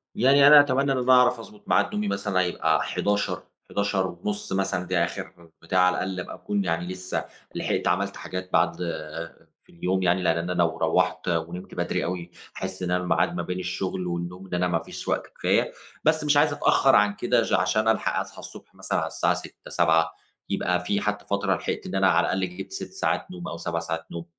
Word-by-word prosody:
يعني 140 +4 +6
أنا 150 0 +10
أتمنى 140 0 +3
إن 135 - +1
أنا 125 +1 +2
أعرف 125 -1 +5
أضبط 105 -2 -12
ميعاد 100 - +3
نومي 105 0 -1
مثلًا 100 -1 0
هيبقى 80 -3 +1
23:00، 100 0 -1 0.3
23:30 100 -2 0
ونُص 210 - -4
مثلًا، 95 -2 0
ده 85 -1 +2
آخر 85 -1 -8
بتاع 90 +3 0
على 90 0 +5
الأقل 95 -1 -3
أبقى - - -6
أكون 100 -1 -2
يعني 85 +1 -1
لسّه 90 0 -4 0.3
لحقت - - -1
عملت 100 +3 0
حاجات 95 0 -6
بعد - - +3 0.9
في - - -35
اليوم 95 +2 -1
يعني، 90 +1 +2
لأن 85 -1 +2
أنا 85 +2 -2
لو 85 -2 +1
روَّحت 90 +3 +1
ونمت 85 +2 -3
بدري - - -1
أوي، 90 0 -4 0.3
أحس 95 -1 -5
إن 90 - -1
أنا 90 0 +1
ميعاد 90 - +1
ما - - -1
بين 90 0 -4
الشغل 90 0 -3
والنوم 85 +2 -5
ده 90 - -1
أنا 90 0 +1
ما 85 -2 +1
فيش - - -9
وقت - - -1
كفاية، - - +2 0.3
بس 155 0 +3
مش 145 -1 +3
عايز 145 0 +4
أتأخر 135 -2 +4
عن 105 0 +4
كده - - +2
ج - - -2
عشان 110 +1 +2
ألحق 110 - +1
أصحى - - -7
الصبح - - -12
مثلًا - - -2
على - - -1
الساعة - - +1
06:00، - - -9
07:00 80 +1 +3 0.4
يبقى 90 0 0
في 100 +1 0
حتّى 105 0 -2
فترة 100 0 0
لحقت - - -4
إن 95 - -5
أنا 95 0 +4
على - - +3
الأقل 95 -1 -2
جبت 95 - -7
6 - - -6
ساعات - - -1
نوم 90 -1 -7
أو 85 - -5
7 85 0 -2
ساعات 80 0 -4
نوم، 85 0 -6
95 Hz, 210 wpm, -25 LUFS, 90-105 Hz, 0.9 s, أنا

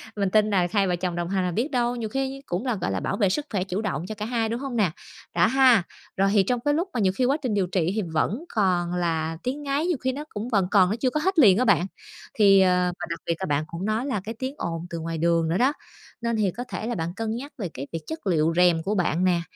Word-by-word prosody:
mình 200 -2 0
tin 215 +1 +3
là 185 -3 +2
hai 200 -2 +2
vợ 180 - +1
chồng 175 0 -3
đồng 175 0 -3
hành 190 -1 0
là 180 - -1
biết 245 - -1
đâu 245 -1 +1
nhiều 225 -3 -4
khi 270 +1 -3
cũng 180 +9 -3
là, 245 -4 0
gọi 135 - -2
là, 95 - -1
bảo 195 - -2
vệ 200 -4 +3
sức 290 +10 -1
khỏe 190 -3 0
chủ 190 +2 -3
động 175 -5 -3
cho 215 - -5
cả 210 +1 -4
hai, 225 -2 -1
đúng 235 +2 -2
hông 270 -3 -5
nè? 200 -8 +2 0.4
Đó 175 - +5
ha, 255 -6 +5 0.3
rồi 195 +1 +3
thì 200 -2 +5
trong 245 +4 0
cái 290 - +3
lúc 340 +5 0
mà 240 - -1
nhiều 190 -2 +2
khi 255 - +1
quá 275 +4 +2
trình 245 -6 -1
điều 195 -3 +1
trị 180 -1 0
thì 215 - +1
vẫn 210 - 0
còn 180 -4 +1
là 165 -2 -1
tiếng 275 +4 -3
ngáy, 285 +3 0
nhiều 345 -6 +1
khi 260 +1 -1
nó 290 +3 -5
cũng 220 +4 -5
vẫn 200 -6 +2
còn, 190 -3 +5
nó 215 - 0
chưa 255 +2 0
có 305 - -1
hết 370 +1 +1
liền 200 -7 +7
á 255 - +2
bạn, 180 -4 +4 0.5
thì, 195 -3 +6
ờ, 180 -1 +3
và - - -3
đặc 170 - -4
biệt 170 - 0
là 190 - -2
bạn 145 0 0
cũng 170 +4 -5
nói 220 +4 0
là 255 -9 -2
cái 225 +1 -6
tiếng 260 +1 -3
ồn 165 0 -4
từ 170 - -5
ngoài 165 0 -4
đường 165 0 +2
nữa 175 - +1
đó, 265 +6 +3 0.5
nên 235 -1 0
thì 205 -4 +1
có 245 - -6
thể 220 - -4
là 240 - -2
bạn 165 0 -3
cân 225 0 -2
nhắc 280 +5 -7
về 190 -7 -4
cái 135 +2 -6
việc 165 -1 -4
chất 320 -10 -6
liệu 165 -2 +2
rèm 175 -2 +4
của 210 +4 -1
bạn 180 -1 +1
nè, 175 -2 +2
200 Hz, 300 wpm, -25 LUFS, 175-245 Hz, 0.5 s, liền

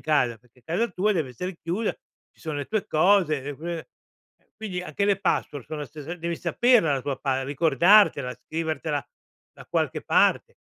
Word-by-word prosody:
casa, 130 -7 +1
perché 125 +2 -27
casa 180 - -1
tua 195 +2 +1
deve 160 -9 -1
essere 180 +9 -6
chiusa, 185 +7 -2 0.4
ci - - -28
sono 155 -2 -4
le 145 - -3
tue 215 -2 -2
cose, 160 -3 +3
e 145 +2 -5
quindi 170 +2 -4 0.6
e - - -40
quindi 200 -5 -4
anche 200 +2 -2
le 200 -1 +2
password 145 -8 -1
son 155 - -5
la 150 - -4
stesa 155 +4 -7
devi 170 -1 -4
saperla 240 - +3
la 135 - -3
tua 135 -1 -3
pa 135 -2 0
ricordartela, 150 0 +4
scrivertela 155 -2 -2 0.5
da - - -14
qualche - - -1
parte. - - +2
160 Hz, 180 wpm, -25 LUFS, 140-185 Hz, 0.6 s, ricordartela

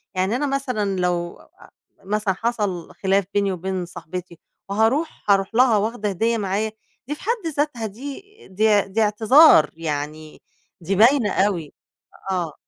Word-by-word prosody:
يعني 190 +4 0
أنا 290 +3 -1
مثلًا 250 -9 -2
لو 175 -1 -1
آآ - - -20 0.3
مثلًا 205 0 -1
حصَل 205 -5 -3
خِلاف 195 0 +1
بيني 200 -1 +1
وبين 185 0 -3
صاحبتي 175 0 -8 0.3
وهارُوح، 225 +11 0
هارُوح 195 +2 +1
لها 245 -2 +5
واخده 215 0 -1
هدية 225 +5 0
معايا، 210 +1 -1 0.4
دي 295 - -3
في - - -16
حَد 445 -4 -2
ذاتها 285 -6 -1
دي 265 - -7 0.3
دي 210 +2 +3
دي 195 +3 -2
اعتذار، 215 - +6
يعني 155 -1 -5 0.4
دي 185 +4 -1
باينة 230 +1 +4
أوي، 185 -7 0 0.6
آه. 175 -5 -2
205 Hz, 140 wpm, -22 LUFS, 185-230 Hz, 0.6 s, اعتذار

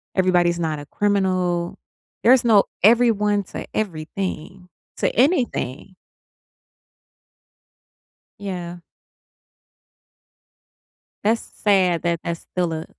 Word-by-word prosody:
everybody's 175 -2 +2
not 160 -3 -2
a 145 - -9
criminal. 185 -2 0 0.5
There's 250 +1 +6
no 220 -4 +5 0.2
everyone 210 -2 +4
to - - -8
everything 185 -1 -4 0.3
to - - 0
anything. 240 - 0 2.5
Yeah. 175 -3 -6 2.4
That's 225 +3 +2
sad 185 -5 +1
that 170 -1 -1
that's 170 0 -4
still 175 -2 -2
a 160 0 -5
185 Hz, 85 wpm, -22 LUFS, 170-205 Hz, 2.5 s, There's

